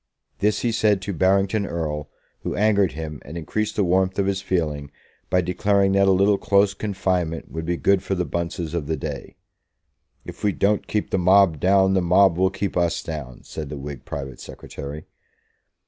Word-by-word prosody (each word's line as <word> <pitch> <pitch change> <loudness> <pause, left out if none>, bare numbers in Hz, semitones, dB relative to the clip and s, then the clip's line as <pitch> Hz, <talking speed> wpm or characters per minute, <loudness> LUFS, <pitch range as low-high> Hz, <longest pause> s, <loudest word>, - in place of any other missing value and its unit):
This 105 +1 +1
he 120 - +1
said 105 -3 +2
to 100 - -3
Barrington 95 +4 +2
Erle, 75 -5 -3 0.3
who - - -4
angered 100 -2 +2
him 75 -2 -6
and 80 +4 -8
increased 110 +6 -2
the 105 - +2
warmth 95 +1 +1
of 100 - +2
his 95 0 -1
feeling 75 -7 -2 0.4
by 90 - +3
declaring 95 +2 +2
that 100 0 +4
a - - +5
little 100 +2 +3
close 100 0 +3
confinement 95 -5 -2
would 80 0 -5
be 85 0 0
good 100 +1 +3
for 95 - -2
the 90 -1 -1
Bunces 85 -1 -3
of 80 -4 -2
the 80 0 -1
day. - - -6 0.9
"If - - -10
we 105 -2 +2
don't 105 +1 +1
keep 105 - -2
the 95 - +1
mob 90 -3 +4
down, 95 +2 +4
the 95 - +3
mob 90 +1 +4
will 95 0 +4
keep 100 0 -3
us 85 -1 0
down," 75 -6 -7
said 75 -3 -7
the 75 - -6
Whig 70 -1 -7
private 70 -2 -6
secretary. 75 +2 -8
95 Hz, 190 wpm, -23 LUFS, 80-100 Hz, 0.9 s, a